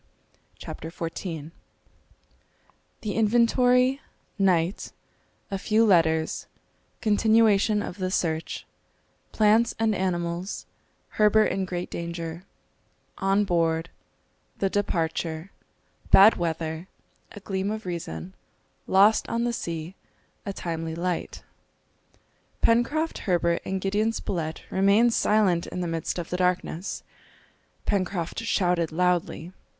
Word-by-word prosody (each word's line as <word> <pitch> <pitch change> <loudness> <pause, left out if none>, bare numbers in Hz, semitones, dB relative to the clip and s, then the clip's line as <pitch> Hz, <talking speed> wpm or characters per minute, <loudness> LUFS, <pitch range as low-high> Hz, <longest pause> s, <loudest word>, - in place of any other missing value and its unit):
] - - -38
CHAPTER 160 - -7
XIV 165 -2 -5 1.5
The 215 -5 -3
Inventory 245 +4 +3 0.4
Night 185 -1 +1 0.6
A 195 - -2
few 220 +3 +3
Letters 160 -5 +2 0.5
Continuation 215 -1 +3
of 180 - -7
the 185 -1 -1
Search 165 -4 -2 0.7
Plants 220 +2 +3
and 225 -1 +2
Animals 175 -1 -2 0.6
Herbert 215 +1 +5
in 195 - -1
great 180 -1 -4
Danger 170 +1 -5 0.7
On 195 +1 +2
Board 165 -2 0 0.7
The 195 -1 0
Departure 165 -2 -2 0.6
Bad 205 +3 +8
Weather 165 0 -3 0.5
A - - -9
Gleam 195 0 -2
of 215 0 -4
Reason 95 - -5 0.5
Lost 200 +3 +4
on 230 0 0
the 240 0 0
Sea 165 -4 -4 0.5
A - - -1
timely 165 -3 -4
Light. 175 +1 -3 1.2
Pencroft, 290 +8 +2
Herbert, 170 -1 +2
and 190 0 -2
Gideon 205 +4 +1
Spilett 160 -7 -4
remained 200 +5 +4
silent 200 -7 +2
in 180 - -4
the 175 - -2
midst 165 0 -3
of 175 -1 -5
the 180 - -1
darkness. 180 0 -1 0.8
Pencroft 185 -4 -1
shouted 180 -7 +1
loudly. 180 0 0
185 Hz, 105 wpm, -26 LUFS, 170-210 Hz, 1.5 s, Bad